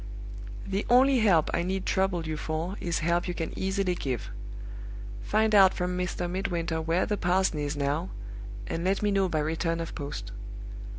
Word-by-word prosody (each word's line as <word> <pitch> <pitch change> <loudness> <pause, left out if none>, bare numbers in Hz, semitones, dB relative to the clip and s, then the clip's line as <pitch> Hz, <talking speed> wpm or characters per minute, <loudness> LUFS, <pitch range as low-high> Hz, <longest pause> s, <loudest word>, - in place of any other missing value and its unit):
"The 195 +1 -1
only 260 +2 +6
help 185 -8 +4
I - - +2
need 190 +2 -1
trouble 190 -3 +1
you 155 0 -2
for 160 +4 -2
is 170 -1 0
help 170 +1 +2
you 175 - -2
can 165 -1 -3
easily 190 -1 +1
give. 130 -9 -3 0.9
Find 215 +1 +2
out 195 -2 +7
from 180 0 -1
Mr. 180 -1 -1
Midwinter 175 -3 -1
where 165 +3 +2
the 210 - 0
parson 180 -3 +2
is 145 0 -2
now, 145 +5 0 0.6
and 165 - -2
let 195 +3 +1
me 205 - +3
know 195 -2 +3
by 155 -2 +1
return 165 +2 0
of 165 - -4
post. 145 -2 -5
175 Hz, 175 wpm, -28 LUFS, 165-190 Hz, 0.9 s, out